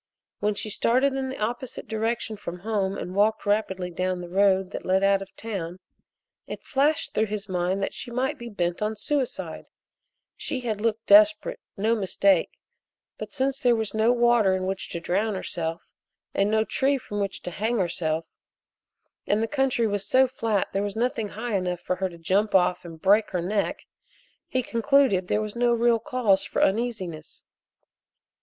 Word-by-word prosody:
When 210 0 0
she 215 - -4
started 260 +6 +2
in 265 0 -2
the 265 - -6
opposite 235 +3 -4
direction 225 0 -2
from 180 -3 -7
home 200 -2 -1
and 180 - -5
walked 215 +3 +2
rapidly 190 -3 0
down 185 +1 -1
the 175 -1 -7
road 190 0 +3
that - - -5
led 190 +1 +2
out 195 0 +4
of 195 - -6
town 185 -6 -5 0.7
it - - -7
flashed 290 +2 +1
through 220 +1 +1
his 210 0 -4
mind 185 +1 -1
that - - -2
she 245 - -5
might 265 +4 -1
be 235 0 -7
bent 175 -4 -2
on 215 +1 -1
suicide 270 +4 -3 0.7
she 260 - -3
had 220 -4 -3
looked 225 0 -1
desperate, 315 +11 +5 0.2
no 220 +3 +2
mistake, 195 -3 +2 0.7
but, - - -6
since 270 0 -1
there 245 -3 +4
was 220 -2 -2
no 220 +2 +3
water 235 -5 +4
in 185 0 -2
which 190 0 -3
to 170 - -4
drown 200 +5 0
herself, 165 -3 -4 0.5
and 200 +1 +2
no 220 0 +3
tree 275 +6 +1
from 205 -4 -6
which 200 -1 -3
to 180 - -4
hang 220 +6 -1
herself, 165 -3 -1 1.0
and 210 +2 +2
the - - 0
country 270 -3 +1
was 205 -2 -1
so 260 +6 +4
flat 225 -5 0
that - - -30
there 195 - 0
was 205 -1 -3
nothing 235 -1 -1
high 225 +1 -3
enough 180 -2 -1
for 180 - -2
her 190 0 -1
to 170 - -12
jump 195 +5 +1
off 180 -1 +3
of 175 - -8
and 160 - -15
break 205 +3 +4
her 180 - -2
neck, 200 +3 -1 0.6
he 255 -1 -1
concluded 235 -6 +2
there 210 - +1
was 215 0 -6
no 240 0 +2
real 235 0 +3
cause 220 -5 +2
for - - 0
uneasiness. 190 -7 -2
210 Hz, 185 wpm, -25 LUFS, 190-235 Hz, 1.0 s, desperate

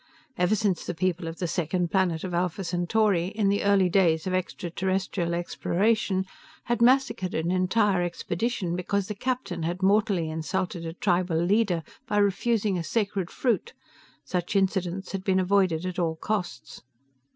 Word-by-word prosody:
Ever 180 +1 +2
since 200 -5 0
the 175 - -4
people 175 0 -1
of 165 0 -6
the 180 - -2
second 175 +1 -1
planet 180 -4 +1
of 185 -2 -4
Alpha 180 +2 -1
Centauri, 175 +1 +1
in 205 0 0
the 200 +1 +1
early 200 -2 +4
days 170 -4 +2
of 185 - -2
extraterrestrial 185 -1 -2
exploration, 190 +3 0 0.4
had 240 -1 -1
massacred 250 -7 +3
an 165 +2 0
entire 185 +1 +2
expedition 175 +2 -2
because 190 +2 -1
the - - -1
captain 245 -6 -3
had 175 +3 -3
mortally 200 -4 +3
insulted 165 +2 -3
a 165 - -5
tribal 180 -2 +1
leader 180 0 +2 0.2
by 210 - 0
refusing 205 -1 +1
a - - -3
sacred 200 -2 -1
fruit, 270 - -1 0.5
such 180 +1 -2
incidents 190 -1 0
had 195 -1 -4
been 190 -2 +2
avoided 185 -3 +2
at 185 0 -3
all 165 -2 0
costs. 180 -6 -4
185 Hz, 155 wpm, -26 LUFS, 175-200 Hz, 0.5 s, early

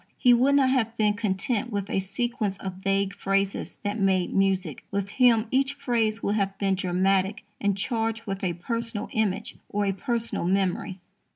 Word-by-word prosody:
He 245 - +5
would 260 +4 +4
not 265 -2 +4
have 230 -3 0
been 210 -1 +3
content 205 +2 -1
with 200 -2 -2
a - - 0
sequence 205 +1 -2
of 190 -1 -6
vague 195 0 +1
phrases 195 0 -1
that 205 +2 -2
made 190 -2 +2
music. 190 -6 0
With 200 0 -2
him 235 -1 +4
each 270 +1 +1
phrase 230 -5 0
would 200 - +1
have 195 -2 -1
been 195 -1 +1
dramatic 190 +2 +1 0.2
and 200 -1 +1
charged 225 +1 -1
with 195 -2 -4
a 180 -2 0
personal 230 +4 -3
image 215 -1 -1
or 205 0 0
a 195 - +2
personal 230 -1 -1
memory. 190 0 0
200 Hz, 175 wpm, -26 LUFS, 195-230 Hz, 0.2 s, He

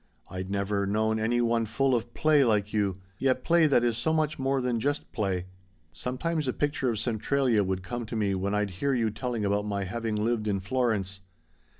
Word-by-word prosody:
I'd 95 0 -5
never 100 0 0
known 110 +2 +1
any 120 +2 +1
one 115 -1 +1
full 130 +5 +1
of 120 -2 -1
play 155 -3 +4
like 105 -3 +1
you 100 -3 0 0.2
yet 130 -1 +1
play 170 -1 +4
that 130 -5 +3
is 120 -1 +1
so 160 - +1
much 155 -2 0
more 135 0 +1
than 125 -2 0
just 145 +5 -2
play. 95 -6 -1 0.5
Sometimes 135 - -2
a 130 - 0
picture 145 -3 0
of 115 - -1
Centralia 120 0 +1
would 95 -1 -2
come 120 +4 -5
to 115 - -5
me 105 -3 +1
when 100 +2 -1
I'd 105 -1 0
hear 140 -1 +2
you 115 -3 +1
telling 115 0 -3
about 100 +1 0
my 100 -1 -1
having 110 +3 -3
lived 110 0 0
in 100 -2 +1
Florence. 100 -3 -1
115 Hz, 205 wpm, -28 LUFS, 100-130 Hz, 0.5 s, play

